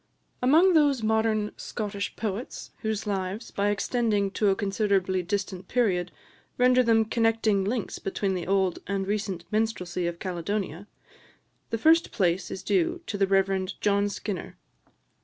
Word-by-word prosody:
Among 320 +9 +5
those 290 -7 +3
modern 220 -1 +1
Scottish 205 -2 -4
poets 215 +2 -5
whose 220 -1 -2
lives, 195 +2 -3
by 200 +1 0
extending 205 -1 0
to 205 +1 +2
a 195 - +3
considerably 195 -2 0
distant 190 0 -3
period, 185 -8 +1 0.5
render 250 0 +5
them 225 -2 +3
connecting 225 -3 +2
links 220 +2 -2
between 195 0 -2
the 180 -2 -4
old 190 -2 +1
and 195 0 -1
recent 195 -4 -3
minstrelsy 210 -5 -1
of 170 0 -4
Caledonia, 185 +1 -3 0.8
the 230 - -1
first 325 +8 +4
place 185 -3 0
is 190 - -6
due 345 -1 +1
to - - -4
the 195 -1 +2
Rev. 195 -1 +2
John 205 0 +2
Skinner. 200 -2 -5
205 Hz, 140 wpm, -27 LUFS, 190-225 Hz, 0.8 s, Among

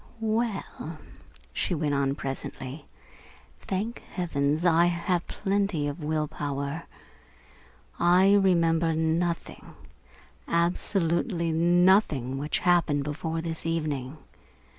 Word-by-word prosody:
"Well," 220 -7 -2 0.6
she 180 - -1
went 150 -2 -1
on 140 -1 +1
presently, 135 +1 -6 0.7
"thank 210 +5 -3 0.2
heavens 155 -2 0
I 170 0 +5
have 175 0 -1
plenty 195 -6 -1
of 145 +3 -5
will 155 0 0
power. 145 +1 -4 1.1
I 180 +3 +5
remember 170 -4 +3
nothing, 165 +2 -2 0.7
absolutely 170 +1 +1
nothing, 170 - +3
which 150 +2 -1
happened 170 -5 +3
before 160 +3 -3
this 165 -1 -4
evening. 150 -4 -2
165 Hz, 95 wpm, -27 LUFS, 150-180 Hz, 1.1 s, I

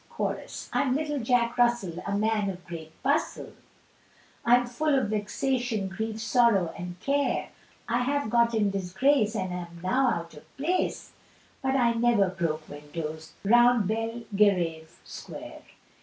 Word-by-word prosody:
Chorus. - - -4
I'm 265 -2 +2
little 295 -1 -1
Jack 240 0 +1
Russell, 235 -8 +2
a 200 0 0
man 215 -1 +1
of 180 -2 -7
great 160 -2 -8
bustle, 285 +4 0 0.9
I'm 245 +1 +5
full 280 +5 0
of 260 - 0
vexation, 220 0 -1
grief, 220 +3 -4
sorrow, 220 -6 +3
and 175 -1 -7
care, 280 +4 0 0.4
I 235 +1 +1
have 280 -3 -1
got 235 -1 +3
in 205 -2 +2
disgrace, 210 +5 +1
and 185 -3 -2
am 170 -1 -7
now 255 +8 +2
out 170 -7 -3
of 150 - -16
place; 330 +7 -1 0.5
But 265 0 0
I 240 -3 +3
never 230 -4 +3
broke 165 -4 -3
windows 155 +2 -7
round 240 0 +5
Bel 225 +2 -2
ge 200 - -1
rave 170 -6 +1
Square. - - -9
220 Hz, 145 wpm, -27 LUFS, 180-245 Hz, 0.9 s, I'm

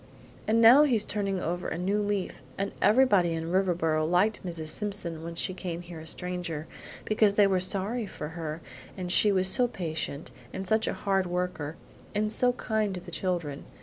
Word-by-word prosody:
And 225 +1 +3
now 240 +5 +9
he's 250 -8 +3
turning 195 -2 -1
over 175 +1 -3
a - - -3
new 195 +4 0
leaf. 205 -7 -2 0.2
And 195 +1 -2
everybody 205 -8 +4
in 165 +1 -3
Riverboro 175 -4 +1
liked 180 +8 +1
Mrs. 165 -4 -3
Simpson 175 -5 0
when 170 0 -6
she 185 - -1
came 175 -2 -5
here 170 -2 -9
a 160 - -10
stranger, 175 -3 -4 0.4
because 215 -1 +3
they 205 - +6
were 190 -2 +2
sorry 200 +5 -2
for 150 -5 -7
her 160 -1 -5 0.4
and 180 -1 -4
she 210 +3 +5
was 185 -1 +3
so 245 +6 +4
patient, 160 -8 -4 0.2
and 190 0 -5
such 220 +2 +2
a - - 0
hard 195 -2 0
worker, 175 -4 -3 0.4
and 215 +1 +1
so 245 +2 +3
kind 220 -5 -1
to - - -5
the 175 - -11
children. 170 -5 -2
185 Hz, 185 wpm, -28 LUFS, 170-205 Hz, 0.4 s, now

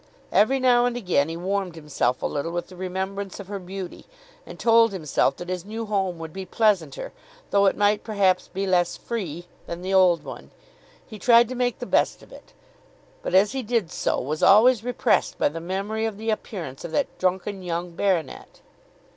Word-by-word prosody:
Every 265 +6 +3
now 245 -1 +4
and 245 0 -2
again 180 -9 +1
he 165 - -5
warmed 190 0 -2
himself 150 -5 -1
a - - +1
little 150 +3 -2
with 175 0 -4
the 185 - -12
remembrance 190 +2 -4
of 200 -1 -9
her 200 -1 -4
beauty, 185 0 -8 0.4
and - - -9
told 230 -1 +5
himself 160 -7 0
that 175 - -8
his 180 -1 -3
new 220 +3 -5
home 195 -4 -1
would 160 -1 -8
be 190 - -5
pleasanter, 185 - 0 0.4
though 200 0 +4
it - - +1
might 205 0 +2
perhaps 195 -4 +1
be 195 +2 -3
less 180 -2 +1
free, 175 -8 -5 0.2
than 170 +1 -6
the 190 +1 -2
old 180 -3 +4
one. - - -9 0.6
He 215 - -11
tried 235 +1 +6
to - - -4
make 245 -1 0
the 245 - -6
best - - +1
of - - -18
it; - - -15 0.7
but - - -2
as 195 +2 +5
he 265 0 -3
did 225 -7 -1
so - - -1
was 150 +4 -3
always 220 +3 +6
repressed 245 0 +1
by - - +2
the 165 +3 -7
memory 200 +5 -2
of 215 -3 -6
the 220 +1 -2
appearance 175 - -5
of - - -5
that 285 - -1
drunken 190 +2 -1
young 175 0 -3
baronet. 170 -4 -2
195 Hz, 195 wpm, -24 LUFS, 175-220 Hz, 0.7 s, tried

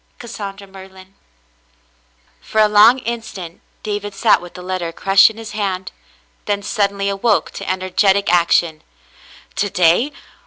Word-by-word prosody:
" - - -41
Cassandra 205 -4 -8
Merlin." 190 0 -15 1.3
For 220 - -3
a 215 - +6
long 210 +4 +6
instant 220 -8 -7 0.2
David 205 -1 -4
sat 220 -1 +3
with 175 0 -12
the 180 - -9
letter 180 -2 -4
crushed 195 +4 +4
in 220 - -12
his 225 -1 -8
hand, 195 -3 -3 0.5
then 205 -1 -2
suddenly 200 -2 -1
awoke 200 +2 0
to 195 - -7
energetic 190 0 +1
action. 170 -2 +2 0.8
"To 205 +1 0
day.? 180 - +2
195 Hz, 140 wpm, -18 LUFS, 185-210 Hz, 1.3 s, a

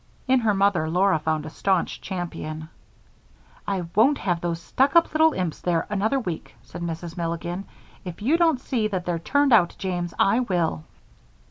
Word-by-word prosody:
In 260 0 +4
her 220 -4 +1
mother 195 -5 +2
Laura 180 0 +3
found 155 -1 -1
a 155 - -7
staunch 190 0 0
champion. 160 -3 -5 1.0
"I 195 -3 -1
won't 265 +7 +4
have 175 -3 -1
those 170 -1 -2
stuck 270 - +1
up 335 -2 +5
little 315 0 +4
imps 180 -4 -3
there 170 -2 0
another 220 +7 +1
week," 180 -10 -6
said - - -9
Mrs. 170 0 -5
Milligan. 170 +3 -3 0.4
"If 180 -4 -7
you 280 +8 +3
don't 325 -6 +3
see 235 -4 -1
that 185 -4 -3
they're 175 -2 -1
turned 285 - +2
out, 180 -6 +4
James, 175 -3 -3
I 220 +5 +3
will." 175 - -1
185 Hz, 170 wpm, -24 LUFS, 170-225 Hz, 1.0 s, up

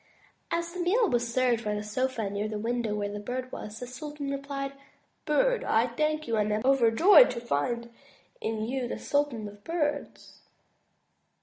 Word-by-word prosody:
'' - - -39
As 340 0 -1
the 365 - -6
meal 410 +7 +3
was 240 -5 0
served 245 -2 +2
by 210 0 -1
the 210 - -3
sofa 230 +1 -1
near 200 +2 -2
the 215 0 -4
window 230 0 -1
where 205 -1 -2
the 205 - -4
Bird 255 +4 -4
was, 215 +1 -7
the 250 - -5
sultan 285 +3 -6
replied: 275 0 -4 0.5
''Bird, - - +2
I 230 +3 +2
thank 305 +5 -1
you 230 -1 0
and 210 0 +1
am 210 +1 0
over 265 -4 +5
joyed 385 - +7
to - - -3
find 235 +4 -2 0.5
in 220 -1 -2
you 255 +1 -2
the - - -4
Sultan 285 -7 -1
of 205 0 -13
Birds." 315 -3 -3
245 Hz, 185 wpm, -28 LUFS, 220-290 Hz, 0.5 s, joyed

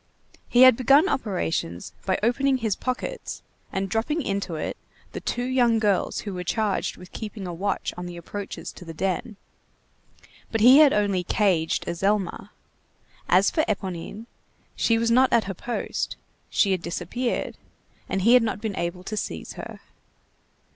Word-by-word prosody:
He 245 +1 +6
had 255 -2 +9
begun 275 +8 +5
operations 170 - -2
by 185 - +2
opening 265 +4 +2
"his 220 -5 -1
pockets," 280 - -4 0.3
and 195 0 -1
dropping 230 - -1
into 195 -6 -2
it 155 - -3 0.4
the - - -5
two 245 - -2
young 245 -2 +3
girls 205 -4 +1
who 205 - -5
were 180 -1 -4
charged 205 +2 -1
with 180 - -13
keeping 210 -3 -6
a 175 - -4
watch 195 +4 -2
on 180 0 -6
the 175 -1 -8
approaches 200 +3 -6
to - - -12
the 165 -2 -9
den. 195 +5 -2 1.2
But 225 - 0
he 255 +5 +9
had 300 -3 +8
only 200 -3 +1
"caged" 175 -4 +1
Azelma. 195 +1 -1 0.8
As 185 +3 +5
for 315 - +2
Éponine, 200 +1 -4 0.5
she 230 - +2
was 230 0 +1
not 255 +2 +5
at 230 - +4
her 195 - -4
post, 235 +6 -3 0.3
she 200 - +2
had 185 -2 0
disappeared, 180 +9 -3 0.5
and 190 0 -1
he 230 +4 +6
had 250 - +7
not 220 -3 -1
been 215 -2 -3
able 175 +1 -3
to 215 - -5
seize 80 - -4
her. - - -9
205 Hz, 160 wpm, -25 LUFS, 185-240 Hz, 1.2 s, had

